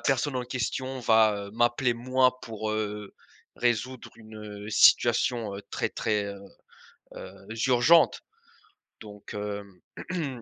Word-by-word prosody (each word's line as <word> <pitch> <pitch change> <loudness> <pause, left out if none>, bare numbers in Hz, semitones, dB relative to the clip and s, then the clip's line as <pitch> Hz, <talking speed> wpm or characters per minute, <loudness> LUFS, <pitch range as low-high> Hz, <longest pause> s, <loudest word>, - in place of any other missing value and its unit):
personne 135 0 0
en 125 - -2
question 130 +2 -3
va, 110 -3 +3
heu, - - -12
m'appeler, 120 +2 +2
moi, 130 +1 +1
pour, 110 -1 -5
heu, 105 -1 -4 0.4
résoudre 120 +1 -1
une, 110 -1 -13 0.3
heu, - - -7
situation 120 -1 +4 0.2
très, - - -1
très, 105 -2 -1
heu 100 -1 -7 0.8
heu, 95 - -9 0.4
urgente», 130 +7 +4 0.8
donc 105 -1 -11 0.6
hem 145 -10 -4
120 Hz, 115 wpm, -27 LUFS, 110-130 Hz, 0.8 s, situation